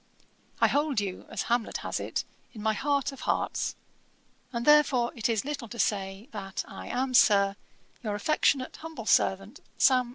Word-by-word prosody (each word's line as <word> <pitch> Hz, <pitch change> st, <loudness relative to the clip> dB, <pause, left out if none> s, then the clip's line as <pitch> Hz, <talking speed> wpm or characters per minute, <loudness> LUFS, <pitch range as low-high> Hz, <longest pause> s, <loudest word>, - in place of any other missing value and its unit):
I -, -, +5 dB
hold 290 Hz, -4 st, +1 dB
you, 195 Hz, -3 st, -5 dB
as -, -, -3 dB
Hamlet 235 Hz, -1 st, 0 dB
has -, -, -2 dB
it, -, -, -2 dB, 0.3 s
'in 215 Hz, -3 st, -8 dB
my 220 Hz, 0 st, +2 dB
heart 280 Hz, +3 st, 0 dB
of 275 Hz, -, -11 dB
hearts,' -, -, -1 dB, 0.8 s
and 235 Hz, -1 st, -3 dB
therefore, 290 Hz, -5 st, +5 dB
it 230 Hz, 0 st, -1 dB
is 225 Hz, +1 st, 0 dB
little 285 Hz, -5 st, -4 dB
to 235 Hz, -, -9 dB
say, 195 Hz, 0 st, -1 dB
that 195 Hz, -2 st, -5 dB
I -, -, -9 dB
am, 255 Hz, +1 st, -1 dB
Sir, 200 Hz, -4 st, +5 dB, 0.5 s
'Your 215 Hz, -4 st, -2 dB
affectionate 260 Hz, +3 st, +1 dB
humble 320 Hz, -8 st, -8 dB
servant, 195 Hz, +5 st, +2 dB, 0.2 s
'SAM. 255 Hz, -2 st, +4 dB
235 Hz, 165 wpm, -28 LUFS, 205-275 Hz, 0.8 s, I